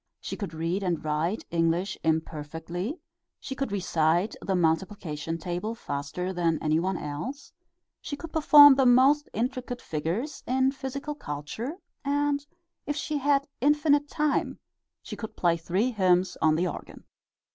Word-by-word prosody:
She - - -5
could 195 -7 -6
read 165 +5 -1
and 175 -5 -2
write 155 +7 -1
English 170 +3 +1
imperfectly, 160 - -2 0.4
she - - -6
could 270 -4 -3
recite 175 0 +1
the 190 - -1
multiplication 165 -2 -1
table 180 +7 -3
faster 180 +1 -4
than 170 -3 +1
any 155 0 +1
one 185 +1 -1
else, 165 - -6 0.5
she 290 - -5
could 330 +2 -9
perform 295 -2 +9
the 265 -1 +3
most 270 +4 +5
intricate 245 +2 -3
figures 170 - -3
in 260 +1 +2
physical 275 +2 -5
culture, 215 - -5 0.3
and 285 0 0 0.4
if 290 - -1
she 300 0 -2
had 280 0 +2
infinite 290 +1 +3
time 300 -2 0 0.5
she - - -7
could 220 - -7
play 170 -2 +3
three 185 +9 0
hymns 185 -4 +2
on 155 -1 +4
the 175 +3 +1
organ. - - -8
195 Hz, 145 wpm, -27 LUFS, 165-275 Hz, 0.5 s, perform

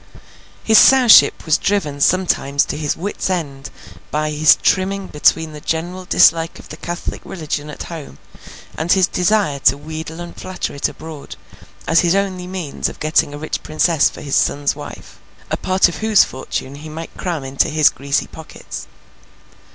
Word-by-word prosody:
His 220 -1 +6
Sowship 255 -4 +6
was 160 0 +2
driven 155 -9 -1
sometimes 140 -6 +2
to - - -5
his 150 -1 -2
wits' 190 +2 -3
end 145 -7 -4 0.4
by 155 0 -1
his 155 +1 +5
trimming 195 +1 +1
between 160 0 +1
the 150 - -10
general 175 +4 -3
dislike 165 -1 +3
of - - -14
the 155 - -9
Catholic 175 +1 -5
religion 150 -4 -5
at 150 - -7
home, 165 -4 -9 0.6
and 165 +2 -2
his 190 -2 +5
desire 180 -5 0
to 135 0 +3
wheedle 160 +2 -7
and 175 0 -8
flatter 185 - -5
it 140 - -1
abroad, 155 -2 -10 0.5
as 165 - +4
his 175 +1 +2
only 190 -2 -2
means 180 -6 -4
of - - -12
getting 155 -1 +1
a 145 - -7
rich 155 +1 -4
princess 155 -1 +2
for - - -12
his 140 -2 -2
son's 145 0 +1
wife: - - -11 0.3
a - - 0
part 185 0 +2
of 175 - -6
whose 220 -2 +4
fortune 130 +1 -5
he 155 +2 -10
might 160 +2 -8
cram 170 -6 -4
into 135 +1 0
his 155 -1 +4
greasy 140 +1 -2
pockets. 160 - -10
160 Hz, 170 wpm, -18 LUFS, 150-185 Hz, 0.6 s, His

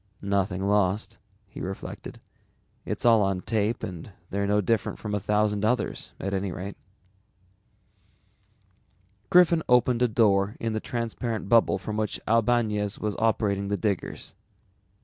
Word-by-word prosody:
Nothing 100 -1 0
lost, 100 0 +1 0.3
he - - -10
reflected. 95 +1 -7 0.7
It's - - -3
all 115 -2 +6
on 95 -2 0
tape 110 +1 -1
and 90 +2 -6 0.2
they're 100 +1 -1
no 105 +1 +3
different 105 +1 0
from 105 -1 -5
a 105 - +1
thousand 105 +1 +1
others 125 +4 -1
at 100 +1 -3
any 95 -1 -1
rate. 95 +3 -6 2.5
Griffin 175 -2 +5
opened 125 0 +4
a 125 - +5
door 105 -3 +2
in 115 -1 -2
the 110 - -1
transparent 115 -2 -3
bubble 115 -4 +4
from 105 +3 -5
which 110 -1 -2
Albañez 110 -2 +1
was 105 -1 -3
operating 105 -3 +1
the 100 0 -1
diggers. 100 -4 -3
105 Hz, 135 wpm, -26 LUFS, 100-115 Hz, 2.5 s, all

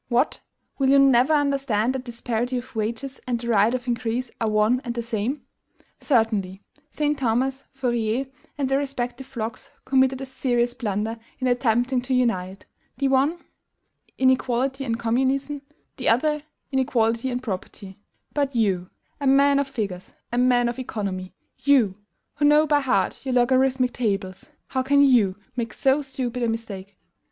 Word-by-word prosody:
What! 245 +4 +1 0.4
will 265 -1 +3
you 280 - +6
never 270 0 +5
understand 275 -6 +1
that 265 -1 -4
disparity 240 +1 -2
of 245 0 -8
wages 235 +5 -3
and 240 -2 0
the 235 0 -5
right 215 0 +4
of 255 0 -3
increase 240 +1 -2
are 225 - +1
one 215 +4 +2
and 240 -1 -4
the 235 - -2
same? 235 +5 -2 0.6
Certainly, 210 -7 0 0.3
St. 295 -1 -1
Simon, 250 +1 +2 0.2
Fourier, 240 -1 -1 0.3
and 280 -2 0
their 270 +1 +2
respective 265 -2 -4
flocks 230 -4 -6 0.2
committed 265 -1 +3
a 270 - -5
serious 245 -2 0
blunder 225 -1 -3 0.2
in 260 - -3
attempting 245 0 +2
to 255 +1 -1
unite, 195 -6 -1 0.3
the 275 -1 +1
one, 280 +6 +2 0.7
inequality 260 +1 +1
and 230 -2 -1
communism; 265 +5 0 0.4
the 260 - 0
other, 300 +6 +2 0.3
inequality 245 -2 +1
and 250 0 -3
property: 195 -2 -6 0.3
but 280 -3 -1
you, 190 -5 +1 0.3
a 280 - -1
man 280 +1 +5
of 280 - 0
figures, 205 -9 -5 0.2
a 240 - -2
man 245 -1 +4
of 240 +2 -3
economy, 195 -7 -4 0.2
you, 260 -9 +4 0.4
who 290 - +2
know 300 +1 +6
by 295 -1 +3
heart 200 -9 0
your 260 -2 -1
LOGARITHMIC 255 0 +3
tables, 195 -5 -2 0.2
how 260 - 0
can 280 +2 +4
you 230 -9 +4 0.2
make 230 -3 -3
so 270 +2 +2
stupid 255 -3 -4
a 235 - +1
mistake? 200 -4 -6
250 Hz, 155 wpm, -24 LUFS, 225-270 Hz, 0.7 s, you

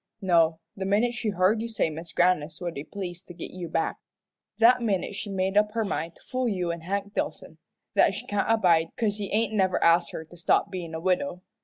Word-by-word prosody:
No 165 -3 +3 0.2
the 195 - -4
minute 210 +5 +2
she 230 -2 -2
heard 200 +3 +2
you 230 - -3
say 220 -7 0
Mis' 165 +2 -8
Grannis 170 -3 +1
would 175 -2 -4
be 140 - -5
pleased 180 -1 -7
to 175 - -10
git 170 - -7
you 180 -2 -6
back, 165 0 -1 0.6
that 245 +2 +6
minute 205 -4 0
she 205 +1 -5
made 190 0 -1
up 210 0 +3
her 225 -1 0
mind 165 -3 -3
to - - -19
fool 255 -1 -1
you 180 -4 -1
and 170 0 -5
Hank 200 +3 -3
Dillson - - -4 0.3
that - - +4
she - - -6
can't 205 +1 -1
abide 175 -7 +4
'cause 210 -3 0
he 205 -2 -4
ain't 220 0 +1
never 190 -3 +2
asked 170 +1 +4
her 160 - -6
to 170 - -16
stop 170 - +2
bein' 170 -4 -5
a - - -3
widow. 185 +3 -1
185 Hz, 225 wpm, -27 LUFS, 170-210 Hz, 0.6 s, that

